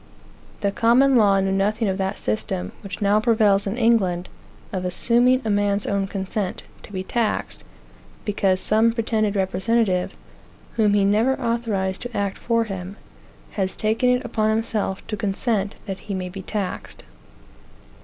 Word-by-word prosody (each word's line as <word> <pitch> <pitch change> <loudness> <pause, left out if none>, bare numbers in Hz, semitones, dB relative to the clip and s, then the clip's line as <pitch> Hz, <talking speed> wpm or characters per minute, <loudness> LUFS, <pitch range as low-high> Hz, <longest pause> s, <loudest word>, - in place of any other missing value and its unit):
The 200 - +1
Common 245 +6 +4
Law 200 -4 +5
knew 190 0 0
nothing 210 +3 +1
of 190 0 -1
that 190 +1 -1
system, 90 -4 -2
which 200 0 -6
now 205 +1 +4
prevails 215 -3 +3
in 200 +4 -2
England, 195 -7 +2 0.4
of 185 -1 -2
assuming 245 +7 +2
a 215 - +1
man's 205 0 +1
own 200 -1 0
consent 195 0 -3 0.2
to - - -13
be 185 -2 -3
taxed, 225 +2 -2 0.6
because 195 -3 +1
some 220 +3 +3
pretended 220 -2 0
representative, 190 0 +1 0.6
whom 210 -3 +3
he 200 -1 +3
never 225 +7 +2
authorized 225 -6 -1
to 245 -1 -5
act 200 -1 -2
for 230 -1 +1
him, 195 -2 -6 0.6
has 190 -2 -2
taken 220 +3 +1
it 250 0 +1
upon 220 -2 0
himself 220 -3 -1
to 220 - -3
consent 205 0 -1
that 195 -3 -5
he 200 0 -5
may 185 -1 -4
be 190 +2 -7
taxed. 200 -1 -5
205 Hz, 155 wpm, -23 LUFS, 195-230 Hz, 0.6 s, Law